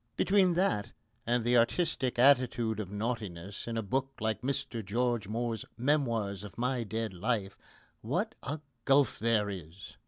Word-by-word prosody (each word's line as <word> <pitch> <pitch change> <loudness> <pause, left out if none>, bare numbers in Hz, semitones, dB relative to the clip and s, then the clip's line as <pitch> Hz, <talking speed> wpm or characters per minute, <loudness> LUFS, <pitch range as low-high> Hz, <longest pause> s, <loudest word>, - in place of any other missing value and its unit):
Between 190 -3 +4
that 170 - +1 0.3
and 120 0 +2
the 120 +1 +3
artistic 130 +1 +1
attitude 120 -4 +4
of 100 -3 -4
naughtiness 105 -3 -4
in 115 -1 -2
a 115 - -1
book 135 +6 -1
like 110 0 -1
Mr 125 -3 -2
George 115 +1 0
Moore's 115 0 -2
Memoirs 115 -7 0
of 105 - -10
My 125 0 0
Dead 110 0 -3
Life, 100 +1 -1 0.5
what - - -1
a 145 +4 -4 0.2
gulf 135 0 +4
there 110 -2 +2
is! 90 -2 -8
115 Hz, 150 wpm, -31 LUFS, 105-130 Hz, 0.5 s, Between